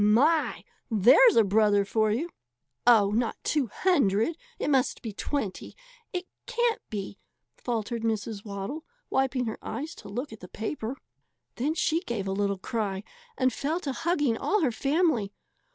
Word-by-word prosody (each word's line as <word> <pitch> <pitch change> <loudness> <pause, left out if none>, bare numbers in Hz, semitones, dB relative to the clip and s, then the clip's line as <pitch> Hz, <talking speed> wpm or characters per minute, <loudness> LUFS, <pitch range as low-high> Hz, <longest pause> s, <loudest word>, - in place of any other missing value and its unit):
My! 285 +10 +3 0.3
There's 255 - +6
a 225 - +7
brother 205 0 +3
for 215 +1 +1
you!" 310 +11 -1 0.6
"Oh, 210 -4 +6
not 230 +2 0
two 290 -5 +1
hundred 235 - +2 0.2
it - - -1
must 265 -2 +1
be 225 -3 -5
twenty 215 -3 -3 0.4
it 360 0 -3 0.2
can't 475 -2 +1
be 200 -2 -5 0.2
" - - -53
faltered 235 -1 -2
Mrs. 220 -2 -2
Waddle, 205 +9 -5 0.3
wiping 265 -1 +1
her 220 - -4
eyes 295 +8 -5
to - - -10
look 240 +5 -4
at 220 - -11
the 180 - -10
paper. 225 +5 -4 0.6
Then 295 +6 0
she 325 0 +2
gave 235 - -4
a - - -1
little 200 0 0
cry 200 -1 -3 0.3
and 255 -2 +2
fell 305 +8 -1
to 285 - -2
hugging 295 -7 +1
all 425 -1 +1
her 275 -6 +2
family. 275 - +1
235 Hz, 160 wpm, -28 LUFS, 210-295 Hz, 0.6 s, a